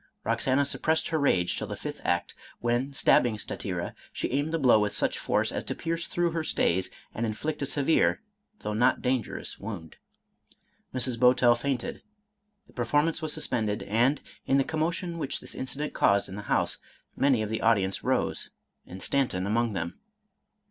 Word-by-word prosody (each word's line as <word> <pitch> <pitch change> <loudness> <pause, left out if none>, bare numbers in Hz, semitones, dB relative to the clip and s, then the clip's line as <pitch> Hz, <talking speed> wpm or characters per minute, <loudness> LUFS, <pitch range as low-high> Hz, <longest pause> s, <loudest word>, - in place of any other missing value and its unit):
Roxana 135 +2 +1
suppressed 160 +3 0
her 160 - 0
rage 90 -11 +2
till - - -4
the - - -5
fifth - - -7
act, 85 0 0 0.3
when, 120 +3 0
stab 135 - +4
bing 115 -3 -1
Statira, 90 -4 -4 0.2
she - - -3
aimed 145 +4 0
the 165 - +1
blow 125 -7 +5
with 105 -1 0
such - - +1
force - - 0
as - - -3
to - - -3
pierce 165 +1 -3
through 175 -1 0
her 165 -1 -2
stays, 95 - +1 0.2
and 115 - -3
inflict 145 +8 -3
a 140 - -1
severe 145 +4 +2 0.4
though 105 - -3
not 115 +4 +2
dangerous 125 -3 -2
wound. 95 -7 -7 0.9
Mrs. 125 -2 -2
Bowtell 125 -1 +5
fainted, 120 +1 -3 0.6
the - - -22
performance 145 +8 +1
was 155 -1 -1
suspended, 110 -7 -1
and, 120 +7 +2 0.3
in 135 - +4
the 135 - +4
commotion 165 +3 -2
which 140 -3 -2
this - - -8
incident 135 +3 -4
caused 100 0 +3
in 95 - -8
the 105 - -5
house, - - +7 0.4
many 135 -5 +3
of 110 - -4
the 110 - -2
audience 100 -4 +2
rose, - - 0 0.4
and 95 +1 -9
Stan 140 -2 +2
ton 90 -3 -3
among 115 +2 +1
them. 85 -2 -4
125 Hz, 175 wpm, -28 LUFS, 105-145 Hz, 0.9 s, house